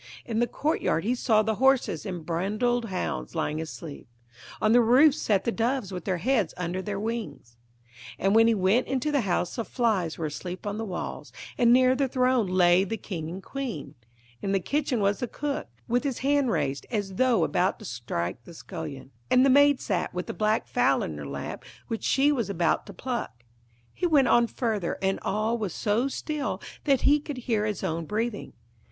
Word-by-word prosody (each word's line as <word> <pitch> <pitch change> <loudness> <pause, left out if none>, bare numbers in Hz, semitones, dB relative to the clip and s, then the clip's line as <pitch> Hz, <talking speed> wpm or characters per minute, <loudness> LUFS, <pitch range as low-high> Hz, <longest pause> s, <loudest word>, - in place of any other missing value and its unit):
In 225 -2 -2
the 240 - +2
courtyard 295 - 0
he 235 +5 +1
saw 220 -3 +2
the 220 -1 -1
horses 265 - +2
and 175 -4 -5
brindled 215 +8 0
hounds 180 - -4
lying 155 +1 -1
asleep, 160 -1 -8 0.5
on 215 - +2
the 240 +1 +6
roof 260 +6 +6
sat 205 -8 0
the 235 - 0
doves 230 -2 -1
with 180 -3 -6
their 185 -2 0
heads 220 -2 0
under 180 +1 -2
their 200 0 -4
wings: 220 - -5 0.6
and 195 +2 +1
when 225 +1 +6
he 230 - +4
went 200 +5 +2
into 270 +3 -1
the 285 -3 +2
house 180 -1 -1
the 230 - -1
flies 215 -10 0
were 165 - -3
asleep 180 +5 -6
on 205 +1 -3
the 225 - -2
walls, 180 -4 -5 0.2
and 235 -1 +4
near 255 +1 +6
the 275 +1 +1
throne 255 -3 +2
lay 180 0 +4
the 220 +3 -3
King 165 -7 -5
and 185 +3 -7
Queen; 235 - -5 0.5
in 195 -1 -1
the 195 - +3
kitchen 270 - -1
was 200 0 +1
the 245 - -2
cook, 290 +4 -3 0.2
with 245 +2 +1
his 275 -4 -2
hand 285 -2 +3
raised 145 -7 -1
as 205 -4 -2
though 250 -8 +3
about 175 +5 +1
to 215 - -12
strike 115 - -4
the 170 - -13
scullion, 150 -7 -8 0.2
and 255 +1 +5
the 275 - +5
maid 285 0 +5
sat 180 -4 -1
with 180 - -2
the - - -5
black 215 +1 +1
fowl - - +2
in - - -4
her - - -7
lap - - -6 0.3
which 225 -2 -3
she 275 +2 +3
was 240 -7 -1
about 175 0 0
to - - -8
pluck. 210 - -5 0.5
He 355 - 0
went 285 -6 +4
on 235 0 +5
further, 220 -8 -2
and 190 0 0
all 215 +4 0
was 200 -6 -3
so 225 +5 +1
still 295 +1 -3 0.3
that 275 -4 +3
he 295 +1 +4
could 290 -2 -7
hear 225 -4 0
his 210 -4 -3
own 165 +1 -2
breathing. 220 0 -3
215 Hz, 200 wpm, -27 LUFS, 180-250 Hz, 0.6 s, the